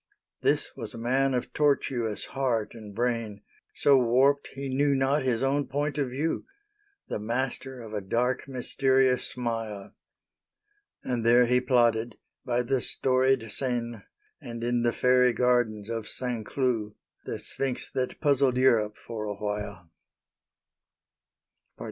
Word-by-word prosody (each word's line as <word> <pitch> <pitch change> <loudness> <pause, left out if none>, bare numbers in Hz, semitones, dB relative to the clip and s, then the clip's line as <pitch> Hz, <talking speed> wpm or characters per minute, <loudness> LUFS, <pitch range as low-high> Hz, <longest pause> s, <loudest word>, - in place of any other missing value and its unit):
This - - +1
was - - -7
a - - -7
man 130 +3 +1
of 125 - -3
tortuous 130 -7 0
heart 125 -6 0
and 105 -3 -10
brain, 115 -3 -2 0.3
So 140 -2 +5
warped 130 +4 +3
he 140 0 -6
knew 140 +2 +2
not 135 +2 +2
his 125 -2 0
own 140 +1 +1
point 145 +3 -2
of 135 -3 0
view 145 +6 -2 0.6
The - - -3
master 125 +3 -3
of 110 -2 -9
a 105 - -2
dark, 120 +8 -1
mysterious 130 0 +2
smile. 115 -5 -4 1.1
And 120 -3 -2
there 120 +2 +6
he 125 +1 +3
plotted, 120 -3 +2 0.3
by 125 -1 0
the 130 +1 0
storied 130 -3 +1
Seine 120 -3 -2 0.4
And 115 -1 -7
in 120 0 +1
the 120 0 +2
fairy 125 0 +4
gardens 120 -4 +1
of 115 -1 -4
St. 120 -4 -4
Cloud, 115 -6 -1 0.3
The - - -3
Sphinx 135 -2 -4
that 130 -1 -2
puzzled 140 -4 +3
Europe, 110 -5 +3
for 110 -2 -6
awhile. 105 -2 -4
125 Hz, 135 wpm, -27 LUFS, 115-135 Hz, 1.1 s, there